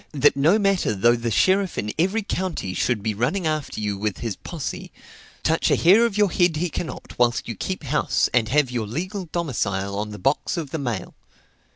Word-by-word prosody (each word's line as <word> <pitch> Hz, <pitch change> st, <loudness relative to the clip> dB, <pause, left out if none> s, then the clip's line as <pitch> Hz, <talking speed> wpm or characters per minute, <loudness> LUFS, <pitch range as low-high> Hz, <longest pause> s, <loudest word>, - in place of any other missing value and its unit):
that 145 Hz, -1 st, +4 dB
no 155 Hz, +9 st, +4 dB
matter 195 Hz, -, +1 dB
though 120 Hz, +5 st, +4 dB
the 115 Hz, 0 st, -2 dB
sheriff 190 Hz, -, +2 dB
in 105 Hz, 0 st, -2 dB
every 195 Hz, +6 st, +1 dB
county 180 Hz, -, -3 dB
should 105 Hz, +1 st, 0 dB
be 110 Hz, -1 st, 0 dB
running 135 Hz, -, -1 dB
after 155 Hz, -6 st, -2 dB
you 105 Hz, -1 st, -1 dB
with 105 Hz, -1 st, -2 dB
his 115 Hz, -5 st, -4 dB
posse, 160 Hz, -5 st, -6 dB, 0.5 s
touch -, -, +2 dB
a -, -, +4 dB
hair 205 Hz, +8 st, +5 dB
of 210 Hz, -3 st, -5 dB
your 205 Hz, -3 st, +3 dB
head 175 Hz, -3 st, +2 dB
he 170 Hz, +2 st, -1 dB
cannot 165 Hz, -, -6 dB
whilst 120 Hz, -1 st, +2 dB
you 115 Hz, -, -3 dB
keep 185 Hz, -, -4 dB
house, 150 Hz, +2 st, +1 dB
and 115 Hz, -3 st, +2 dB
have 145 Hz, -1 st, +2 dB
your 115 Hz, -4 st, -2 dB
legal 185 Hz, -, -4 dB
domicile 100 Hz, -, -2 dB
on 105 Hz, +1 st, -3 dB
the 105 Hz, -, -7 dB
box 135 Hz, -, 0 dB
of 155 Hz, -5 st, -4 dB
the 160 Hz, -, -3 dB
mail. 120 Hz, -9 st, -4 dB
140 Hz, 205 wpm, -23 LUFS, 110-180 Hz, 0.5 s, hair